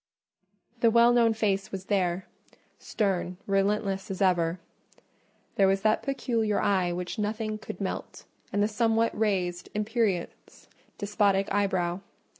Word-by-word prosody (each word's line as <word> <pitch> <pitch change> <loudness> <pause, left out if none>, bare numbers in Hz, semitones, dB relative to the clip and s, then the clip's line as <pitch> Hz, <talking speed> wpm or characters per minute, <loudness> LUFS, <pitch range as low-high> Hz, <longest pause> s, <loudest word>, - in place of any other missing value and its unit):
The 230 - +5
well 235 +1 +5
known 230 -2 +4
face 200 -3 0
was 190 -1 -6
there: 185 -2 0 0.5
stern, 185 -3 -1
relentless 195 0 0
as 195 - -4
ever—there 180 +2 -2
was 195 0 +2
that 215 0 +3
peculiar 230 -6 0
eye 185 -3 +1
which 180 +5 -4
nothing 215 0 -2
could - - -8
melt, - - -5 0.3
and 205 - +1
the - - +3
somewhat 225 +1 +1
raised, 185 -5 -1
imperious, 210 -4 -2 0.3
despotic 200 -2 +1
eyebrow. 185 -3 0
200 Hz, 120 wpm, -27 LUFS, 190-220 Hz, 0.5 s, The